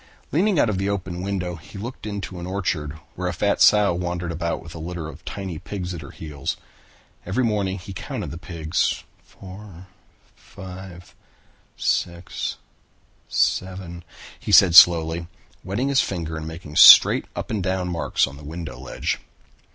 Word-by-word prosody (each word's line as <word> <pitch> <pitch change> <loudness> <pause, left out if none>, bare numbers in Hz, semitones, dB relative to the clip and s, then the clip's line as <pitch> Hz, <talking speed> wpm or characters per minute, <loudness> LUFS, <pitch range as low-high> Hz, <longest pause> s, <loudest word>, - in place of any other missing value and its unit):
Leaning 190 +4 +2
out - - +4
at 100 -3 -1
the 95 +1 0
open 95 -3 -3
window, 90 -3 -3
he 80 +5 -13
looked 115 +2 -7
into 100 -3 -5
an 85 - -6
orchard 90 -6 -2 0.2
where 90 0 -3
a 90 - -2
fat 100 +4 0
sow 105 -3 +6
wandered 85 0 -3
about 85 0 -2
with 80 - -11
a 80 - -8
litter 85 0 -5
of 75 - -11
tiny 95 -5 -5
pigs 90 0 -5
at 85 - -7
her 70 - -10
heels. 75 -4 -5 0.7
Every 110 +9 -1
morning 100 -4 0
he 95 +1 -9
counted 90 - -5
the 85 - -7
pigs. 85 -2 -1 0.2
"Four, 95 -1 -12 0.5
five, 95 -2 -11 0.6
six, 85 0 -2 0.7
seven," 90 -2 -1 0.4
he - - -5
said 90 -3 +7
slowly, 85 -1 +7 0.4
wetting 105 +9 -1
his 135 -1 +4
finger 85 -4 -4
and 80 0 -5
making 80 -2 -8
straight - - +9
up - - -5
and 105 -3 -1
down 95 0 -1
marks 85 -2 +1
on 70 0 -10
the 75 - -13
window 75 -4 -7
ledge. 65 - -3
90 Hz, 160 wpm, -23 LUFS, 85-95 Hz, 0.7 s, straight